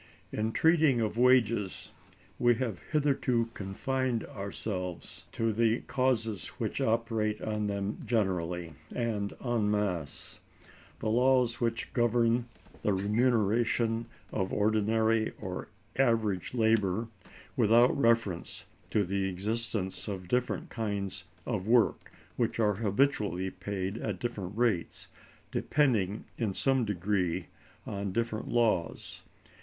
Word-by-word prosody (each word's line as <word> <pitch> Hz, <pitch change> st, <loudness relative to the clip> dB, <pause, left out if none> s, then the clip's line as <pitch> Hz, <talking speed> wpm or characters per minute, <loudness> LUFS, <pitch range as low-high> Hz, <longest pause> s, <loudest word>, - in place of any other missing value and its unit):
In 110 Hz, +1 st, -1 dB
treating 160 Hz, -3 st, +4 dB
of 110 Hz, -2 st, 0 dB
wages, 115 Hz, -5 st, +2 dB, 0.5 s
we 120 Hz, 0 st, +5 dB
have 115 Hz, -6 st, -3 dB
hitherto 135 Hz, -6 st, +1 dB
confined 125 Hz, +5 st, -2 dB
ourselves 95 Hz, -3 st, -5 dB
to 115 Hz, -1 st, 0 dB
the 115 Hz, +1 st, +2 dB
causes 115 Hz, -6 st, 0 dB
which -, -, -2 dB
operate 110 Hz, -2 st, 0 dB
on 105 Hz, -1 st, -2 dB
them 100 Hz, 0 st, -2 dB
generally, 90 Hz, -7 st, -1 dB, 0.2 s
and 110 Hz, -4 st, -1 dB
en 115 Hz, -4 st, +1 dB
masse; 95 Hz, -8 st, -2 dB, 0.6 s
the -, -, -4 dB
laws 125 Hz, 0 st, +3 dB
which 115 Hz, -1 st, -1 dB
govern 120 Hz, 0 st, +2 dB, 0.3 s
the 105 Hz, -, +1 dB
remuneration 115 Hz, +2 st, +2 dB, 0.2 s
of 95 Hz, -, -1 dB
ordinary 110 Hz, +1 st, +2 dB
or -, -, -5 dB, 0.3 s
average 115 Hz, -6 st, +1 dB
labor, 110 Hz, -2 st, +2 dB, 0.5 s
without 115 Hz, +3 st, +5 dB
reference 115 Hz, -9 st, +1 dB, 0.2 s
to 105 Hz, -, +2 dB
the 95 Hz, +1 st, -1 dB
existence 105 Hz, +1 st, -2 dB
of 95 Hz, -3 st, -5 dB
different 125 Hz, +5 st, -1 dB
kinds 100 Hz, -4 st, -3 dB, 0.2 s
of 105 Hz, -5 st, -2 dB
work 115 Hz, -1 st, +3 dB, 0.3 s
which -, -, 0 dB
are 105 Hz, -2 st, +3 dB
habitually 100 Hz, -3 st, +1 dB
paid 100 Hz, 0 st, -4 dB
at 105 Hz, -4 st, -3 dB
different 105 Hz, -5 st, -4 dB
rates, 115 Hz, -8 st, 0 dB, 0.4 s
depending 110 Hz, -9 st, +1 dB
in 105 Hz, -5 st, -1 dB
some 135 Hz, -3 st, +2 dB
degree 95 Hz, -3 st, 0 dB, 0.4 s
on 100 Hz, -1 st, -3 dB
different 115 Hz, +2 st, -2 dB
laws. 110 Hz, -8 st, 0 dB
110 Hz, 110 wpm, -30 LUFS, 100-120 Hz, 0.6 s, we